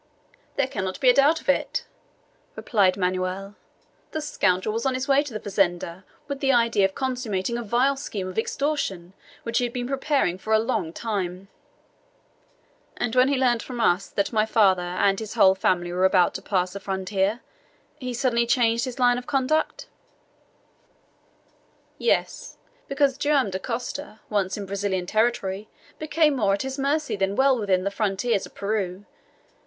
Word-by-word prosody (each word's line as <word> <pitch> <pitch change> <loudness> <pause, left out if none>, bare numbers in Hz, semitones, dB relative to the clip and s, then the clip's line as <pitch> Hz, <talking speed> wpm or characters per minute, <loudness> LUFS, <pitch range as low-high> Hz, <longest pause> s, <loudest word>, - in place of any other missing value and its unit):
"There 280 - +2
cannot 190 -7 -4
be 255 -2 +6
a - - 0
doubt 290 +5 +4
of - - -20
it," 280 - 0 0.7
replied 195 -4 +2
Manoel. 185 +1 -2 0.6
"The 315 - -1
scoundrel 195 -9 0
was 230 +1 -2
on 265 -1 0
his 255 +1 -3
way 275 0 +4
to 290 -3 -7
the 215 - -4
fazenda 185 -2 -1 0.2
with 280 -1 -4
the 270 -1 +2
idea 230 -5 +3
of 190 - -2
consummating 240 -5 -2
a 240 - -2
vile 245 +5 +2
scheme 205 -8 -5
of 185 +3 -2
extortion 225 - -2 0.3
which 230 0 0
he - - 0
had 240 -1 -2
been 245 -1 -3
preparing 270 - 0
for 220 +3 -2
a - - +7
long 220 -7 -1
time." 195 -2 -4 1.5
"And 240 0 -2
when 255 +1 +5
he 280 0 +1
learned 245 -3 +2
from 250 -2 -7
us 195 -4 +2
that 200 +3 -2
my 215 -1 +3
father 205 -5 +3
and 190 +2 +1
his 220 0 -6
whole 190 -4 +6
family 175 -2 0
were 185 +1 +2
about 185 -2 +4
to - - -5
pass 185 -2 -1
the 200 - -6
frontier, 195 +3 -1 0.6
he 255 -2 -4
suddenly 235 -1 +1
changed 235 -1 +2
his 255 0 -6
line 245 -1 +3
of 250 - -13
conduct?" 285 +3 0 2.1
"Yes. - - -1 0.3
Because 275 -1 +1
Joam 285 -8 +2
Dacosta 240 +5 -5
once 200 -2 0
in 205 - -5
Brazilian 195 -2 -2
territory 215 -1 0 0.3
became 310 -1 +2
more 200 -4 +2
at 200 - -4
his 265 +1 -5
mercy 290 +1 0
than 195 0 -1
while 265 0 +3
within 190 -3 +1
the 200 - -1
frontiers 205 +1 0
of - - -23
Peru. 200 -2 -2
220 Hz, 170 wpm, -24 LUFS, 190-260 Hz, 2.1 s, a